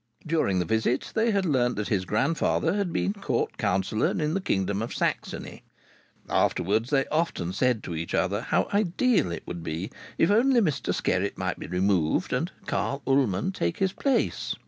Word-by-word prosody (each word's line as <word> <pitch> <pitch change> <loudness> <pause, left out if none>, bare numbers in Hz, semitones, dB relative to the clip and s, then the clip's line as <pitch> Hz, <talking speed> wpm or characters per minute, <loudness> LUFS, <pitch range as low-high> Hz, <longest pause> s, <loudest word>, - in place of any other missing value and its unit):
During 155 - +1
the 90 - +1
visit 110 +6 0
they 225 +1 +2
had 200 -3 +1
learnt 125 -6 +2
that 105 - -3
his 95 -4 0
grandfather 135 - +1
had 200 -3 -1
been 195 +4 0
Court 200 - -2
Councillor 100 +1 +1
in 155 0 -1
the 195 - 0
Kingdom 100 - 0
of 115 - -4
Saxony. - - -3 0.7
Afterwards 110 +6 +1
they 135 -2 +2
often 155 - -1
said 125 +1 +1
to 85 - -5
each 85 +1 -3
other 100 +4 +1
how - - +1
ideal 205 - +2
it - - -5
would 85 -1 -6
be 85 +5 -4 0.3
if 165 - +3
only 245 +4 +4
Mr 155 -11 0
Skerritt - - 0
might - - -2
be - - -6
removed 90 -3 +1
and - - -1
Carl 140 0 -2
Ullman 135 - +2
take 85 - -2
his 190 -1 +1
place. 275 +4 0
125 Hz, 175 wpm, -26 LUFS, -, 0.7 s, only